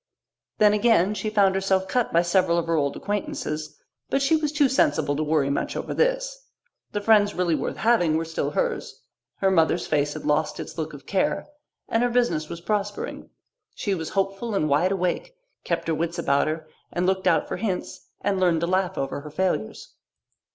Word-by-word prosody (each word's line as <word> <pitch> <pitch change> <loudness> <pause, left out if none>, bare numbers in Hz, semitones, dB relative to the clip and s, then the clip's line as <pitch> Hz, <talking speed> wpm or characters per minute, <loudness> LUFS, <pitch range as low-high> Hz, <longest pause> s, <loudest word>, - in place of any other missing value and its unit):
Then, 210 -1 +5
again, 210 -3 +3
she 215 +1 -3
found 200 -3 +3
herself 190 0 +1
cut 245 +4 0
by 170 +1 +4
several 175 -1 +2
of 170 - 0
her 165 - -1
old 140 -3 0
acquaintances. 155 -7 -4 0.3
But 275 - +1
she 275 +4 +4
was 305 -2 0
too 295 -2 +3
sensible 265 - +2
to 150 - -1
worry 150 -2 +1
much 140 - -2
over - - -4
this. - - 0 0.4
The 205 - -2
friends 205 -1 +4
really 180 -2 +1
worth - - -2
having 175 -9 +3
were 165 - -2
still 165 0 -2
hers, - - -3 0.4
her 195 -1 +3
mother's 170 -1 +2
face 145 -1 0
had 155 - -7
lost 150 +1 0
its - - -7
look 155 -2 -4
of 145 - -11
care, 195 - 0 0.4
and 225 - +1
her 245 - +2
business 240 -11 +1
was 170 0 -7
prospering. 205 +1 -3 0.5
She 205 -5 -1
was 165 -4 -3
hopeful 195 +3 -1
and 155 - +1
wide 155 +6 +2
awake, 195 - -1 0.3
kept 170 -1 -2
her 165 - +1
wits 170 +2 -2
about 140 -4 +2
her 155 0 -3 0.2
and 175 +1 -1
looked 190 0 +1
out - - +3
for - - -3
hints, 195 -5 -4
and 200 -1 0
learned 175 -3 +2
to - - +1
laugh 185 0 0
over 135 +1 -3
her 150 - -9
failures. 150 - -2
185 Hz, 195 wpm, -25 LUFS, 160-210 Hz, 0.5 s, Then